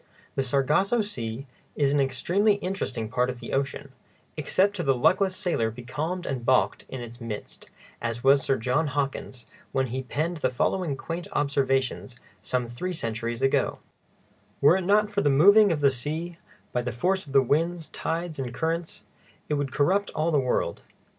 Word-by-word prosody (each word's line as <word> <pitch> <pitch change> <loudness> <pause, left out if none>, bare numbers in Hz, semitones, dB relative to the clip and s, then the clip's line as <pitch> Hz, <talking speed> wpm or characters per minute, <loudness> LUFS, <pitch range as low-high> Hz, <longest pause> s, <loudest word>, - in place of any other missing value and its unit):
The - - 0
Sargasso 150 - +2
Sea 125 - -5 0.3
is 140 -1 +2
an 145 - +3
extremely 175 +11 +2
interesting 185 - -3
part 125 +2 0
of 125 -1 -5
the - - -7
ocean, 135 0 -2 0.4
except 200 +2 +1
to - - -1
the 135 -3 +3
luckless 185 +9 +3
sailor 165 -12 0
becalmed 150 +10 -4
and 130 -3 -3
balked 130 +1 +2
in 130 - -6
its 120 +1 -9
midst, 110 -3 -7 0.3
as 115 0 -3
was 135 +1 +6
Sir 135 0 +1
John 130 +7 +1
Hawkins 135 -4 -3 0.3
when 135 0 +1
he 130 - -1
penned 155 +6 -2
the - - +1
following 150 +3 0
quaint 170 +5 -5
observations, 135 -3 0 0.3
some 125 -1 -1
three 120 +11 -4
centuries 115 -5 -3
ago: 135 - +2 0.8
Were 150 +6 +6
it 190 - -3
not 210 +2 +3
for 205 -1 0
the 145 - +3
Moving 200 +9 +7
of 155 -3 -1
the 140 -1 +5
Sea, 160 +7 -3 0.3
by 125 - 0
the 125 0 -3
Force 180 - 0
of 140 - -9
Winds, 160 +5 +2
Tides 165 -2 -3
and 125 -2 -3
Currents, 165 +5 -3 0.5
it - - +1
would 145 -2 -1
corrupt 190 +10 +2
all 160 +2 +1
the 150 - +3
World. 130 -2 -1
140 Hz, 175 wpm, -26 LUFS, 125-175 Hz, 0.8 s, Moving